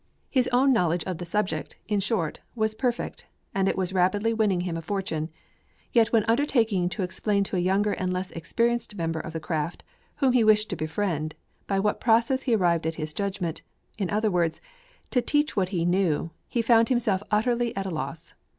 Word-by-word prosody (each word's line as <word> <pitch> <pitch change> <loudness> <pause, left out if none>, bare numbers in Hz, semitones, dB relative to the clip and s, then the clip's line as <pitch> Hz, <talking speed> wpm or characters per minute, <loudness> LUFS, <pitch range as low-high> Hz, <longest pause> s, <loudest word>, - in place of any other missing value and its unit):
His 255 -2 +2
own 260 +2 +4
knowledge 175 -6 +1
of 185 -3 -4
the 175 - -6
subject, 185 -4 -2
in 210 -1 +1
short, 195 -6 -1 0.2
was 220 -1 0
perfect, 240 +1 -2 0.3
and 195 0 +1
it - - -1
was 190 -1 -1
rapidly 200 +5 +2
winning 210 -5 +2
him 175 -2 -3
a 165 - -3
fortune. 165 -4 -2 0.6
Yet 230 -1 +4
when 225 -2 +4
undertaking 225 -7 +2
to 180 +2 -3
explain 200 +2 0
to 195 - -4
a - - +2
younger 195 +3 +2
and 185 0 -2
less 185 +1 -3
experienced 235 +7 -1
member 165 -3 -2
of 165 - -6
the 160 - -4
craft, 160 0 -3 0.3
whom 270 -4 +2
he 245 -2 +4
wished 215 0 +4
to - - -1
befriend, 155 -1 -2 0.3
by 195 - 0
what 210 +2 0
process 235 +3 +3
he 245 -4 +2
arrived 170 -5 +2
at 160 - -2
his 155 -1 -4
judgment, 190 -4 -3 0.4
in 190 -4 -1
other 215 0 +1
words, 170 -3 +1 0.5
to 250 - +3
teach 295 +5 +1
what 190 -3 +1
he 175 -4 -1
knew, 175 -3 +1 0.2
he 235 - -1
found 230 0 +5
himself 230 -7 +1
utterly 235 +2 +1
at 195 - -1
a 190 - -3
loss. 160 +1 -5
195 Hz, 195 wpm, -26 LUFS, 175-225 Hz, 0.6 s, found